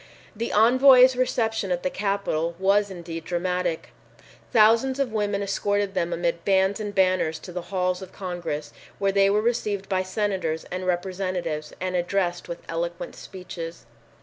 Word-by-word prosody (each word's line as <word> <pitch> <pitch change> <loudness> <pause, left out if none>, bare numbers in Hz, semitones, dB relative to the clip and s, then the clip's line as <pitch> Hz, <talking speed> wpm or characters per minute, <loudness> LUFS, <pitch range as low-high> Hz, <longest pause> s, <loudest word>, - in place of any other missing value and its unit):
The 230 +2 -3
envoys' 255 +3 +7
reception 225 -5 0
at 175 -1 -1
the 185 - 0
Capitol 195 -5 -1
was 200 +2 +3
indeed 170 -3 -7
dramatic. 180 -1 -2 0.6
Thousands 230 +4 +4
of 275 -4 0
women 205 -2 0
escorted 200 0 0
them 170 -2 -1
amid 170 0 -1
bands 195 +1 +2
and 205 -1 -5
banners 185 -4 +2
to 180 - -10
the 180 0 -4
halls 185 -1 0
of 190 - -9
Congress, 175 -5 -5 0.2
where 195 0 +1
they 195 0 +4
were 210 +2 +2
received 210 -4 -1
by 190 -1 +1
senators 185 -4 -2
and 185 0 -4
representatives 180 -4 -2
and 185 0 -2
addressed 175 0 -1
with 170 - -6
eloquent 170 +1 -4
speeches. 170 -3 -8
190 Hz, 150 wpm, -25 LUFS, 175-205 Hz, 0.6 s, envoys